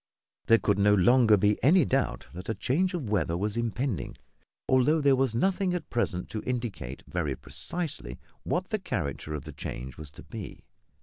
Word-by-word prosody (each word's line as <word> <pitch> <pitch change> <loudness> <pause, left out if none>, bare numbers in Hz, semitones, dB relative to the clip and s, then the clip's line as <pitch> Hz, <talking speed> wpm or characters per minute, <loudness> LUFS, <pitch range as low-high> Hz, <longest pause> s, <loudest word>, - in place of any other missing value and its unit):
There 115 - +7
could 100 -3 +1
no 105 +1 +5
longer 110 +2 +5
be 105 +2 +2
any 165 +4 +6
doubt 135 0 0
that 90 +4 -8
a 110 - 0
change 180 - 0
of 150 -9 -3
weather 85 -5 0
was 105 +3 -2
impending, 115 0 -2 0.5
although 130 +5 +4
there 140 -2 +4
was 130 -3 +1
nothing 185 - +1
at 175 - -6
present 90 -7 -1
to 110 - -4
indicate 115 - -4
very - - -2
precisely 145 - -5 0.2
what 185 +1 -2
the 215 - 0
character 75 - -3
of 70 - -5
the 75 -1 -9
change 65 0 -6
was 75 -2 -8
to - - -12
be. - - -8
115 Hz, 180 wpm, -28 LUFS, 90-140 Hz, 0.5 s, There